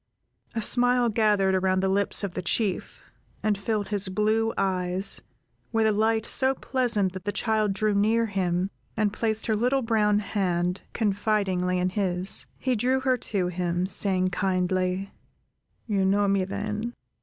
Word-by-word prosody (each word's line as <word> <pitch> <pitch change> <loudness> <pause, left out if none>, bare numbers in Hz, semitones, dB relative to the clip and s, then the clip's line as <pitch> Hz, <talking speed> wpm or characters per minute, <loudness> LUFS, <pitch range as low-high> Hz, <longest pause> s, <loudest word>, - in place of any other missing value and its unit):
A 225 - 0
smile 245 0 +3
gathered 210 -3 +2
around 185 0 +1
the 190 - +1
lips 200 +2 0
of 195 -3 -3
the 185 - -3
Chief, 190 +2 -2 0.4
and 215 -1 +2
filled 205 +1 -2
his 205 -2 -1
blue 215 +3 +1
eyes, 185 0 0 0.5
with 225 -1 +2
a 220 - +4
light 220 +1 +1
so 265 0 +2
pleasant 235 -9 0
that 190 -1 -7
the 205 - -1
child 215 -2 0
drew 215 +1 0
near 220 +3 +2
him, 190 -2 -1 0.3
and 210 -2 +1
placed 220 0 -1
her 220 - +1
little 250 +5 +1
brown 215 -2 +2
hand 180 -3 -1
confidingly 200 -4 0
in 180 0 +1
his. 185 -1 0
He 255 -1 0
drew 255 +4 +1
her 260 -1 +2
to 195 -6 -2
him, 175 0 -1
saying, 185 -1 +2
kindly:— 185 0 -1 0.7
"You 200 -4 0
know 200 +2 +2
me, 195 -1 +2
then? 210 +4 -4
205 Hz, 155 wpm, -26 LUFS, 185-220 Hz, 0.7 s, a